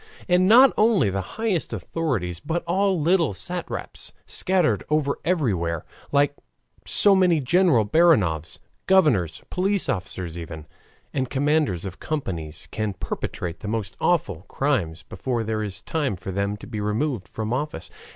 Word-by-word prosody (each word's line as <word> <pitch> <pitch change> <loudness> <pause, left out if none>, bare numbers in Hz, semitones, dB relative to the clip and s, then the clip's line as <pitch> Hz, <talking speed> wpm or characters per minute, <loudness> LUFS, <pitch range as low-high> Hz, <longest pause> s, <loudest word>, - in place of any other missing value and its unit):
And 180 0 +4
not 250 +5 +8
only 210 - +4
the 95 +1 -1 0.2
highest 220 -7 -1
authorities, 105 - -2
but 165 - -2
all 190 +2 +1
little 165 - +2
satraps 175 - -4
scattered 185 -4 +1
over 150 -2 +1
everywhere, 95 - 0 0.3
like 145 0 +3 0.5
so 205 - +4
many 180 -4 +4
General 150 - +3
Baranovs, 105 - +3 0.3
governors, 125 - +3
police 195 +1 +1
officers 90 -6 -3
even, 80 -2 -8 0.5
and 130 -3 -1
commanders 145 - +1
of 95 -1 -7
companies, 85 - -4
can 110 -2 -2
perpetrate 90 -1 -4
the 105 - -7
most 110 -1 -3
awful 110 - +1
crimes 100 - -1
before 120 -3 -3
there 110 0 -2
is 100 -3 -5
time 150 - -1
for 90 +2 -6
them 100 +2 -1
to - - -11
be 110 -3 -5
removed 105 - -1
from 110 +6 -4
office. 130 - -4
130 Hz, 140 wpm, -24 LUFS, -, 0.5 s, not